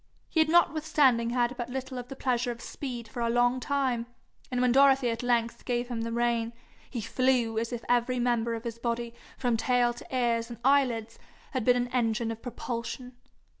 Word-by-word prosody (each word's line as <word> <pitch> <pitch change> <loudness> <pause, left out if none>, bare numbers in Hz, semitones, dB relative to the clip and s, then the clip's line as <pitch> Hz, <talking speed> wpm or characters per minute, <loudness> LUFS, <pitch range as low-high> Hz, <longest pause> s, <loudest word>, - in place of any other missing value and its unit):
He 325 - 0
had 315 0 +4
notwithstanding 300 -8 +3
had 240 +1 +1
but 240 -1 -4
little 260 0 -4
of 245 - -7
the 270 - -8
pleasure 250 -2 0
of 235 -1 -4
speed 240 -3 -6
for 245 - -8
a 235 0 +1
long 245 +2 +3
time, 255 -4 0 0.4
and 250 - -1
when 250 0 +3
Dorothy 270 -1 +5
at 230 - -3
length 235 -1 0
gave 245 0 -1
him 235 -2 -3
the 230 0 -3
rein, 235 -1 0 0.4
he 240 - -4
flew 240 -1 +1
as 230 +1 -3
if 235 -2 -5
every 245 +1 +2
member 235 -1 +1
of 225 - -6
his 230 -1 -5
body 235 0 -2 0.2
from 245 -3 +1
tail 245 +1 +2
to - - -12
ears 235 -2 +1
and 235 - -7
eyelids 245 -5 +2 0.3
had 260 -4 -1
been 245 +2 +4
an 245 0 0
engine 230 -2 0
of 225 0 -7
propulsion. 245 +1 -5
245 Hz, 200 wpm, -28 LUFS, 235-255 Hz, 0.4 s, Dorothy